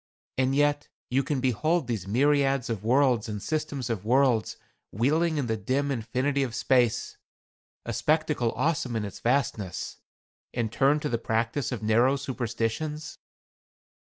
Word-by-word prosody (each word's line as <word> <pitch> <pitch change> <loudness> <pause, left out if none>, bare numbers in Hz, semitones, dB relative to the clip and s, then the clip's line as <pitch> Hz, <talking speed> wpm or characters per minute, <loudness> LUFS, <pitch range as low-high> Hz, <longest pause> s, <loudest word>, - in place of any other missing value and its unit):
And 130 +1 +2
yet 145 0 +2 0.2
you 135 +2 +3
can 140 0 -2
behold 155 +7 +1
these 110 -6 -3
myriads 135 +2 +2
of 105 -3 -4
worlds 125 -2 +3
and 105 -1 -4
systems 150 -1 -3
of 115 -5 -3
worlds 125 -1 +2 0.3
wheeling 155 - +1
in 140 - 0
the 110 -2 0
dim 135 +7 -1
infinity 130 +4 -1
of 125 -4 -2
space 125 -4 +1 0.7
a - - -3
spectacle 150 -6 +1
awful 135 -4 0
in 110 -2 -1
its 100 - -8
vastness 115 -7 -1 0.6
and 115 -3 -1
turn 140 +5 +3
to 150 - -2
the 115 - -1
practice 115 +4 -1
of 115 -4 -4
narrow 120 +5 +4
superstitions?" 135 +3 -3
130 Hz, 145 wpm, -27 LUFS, 115-145 Hz, 0.7 s, narrow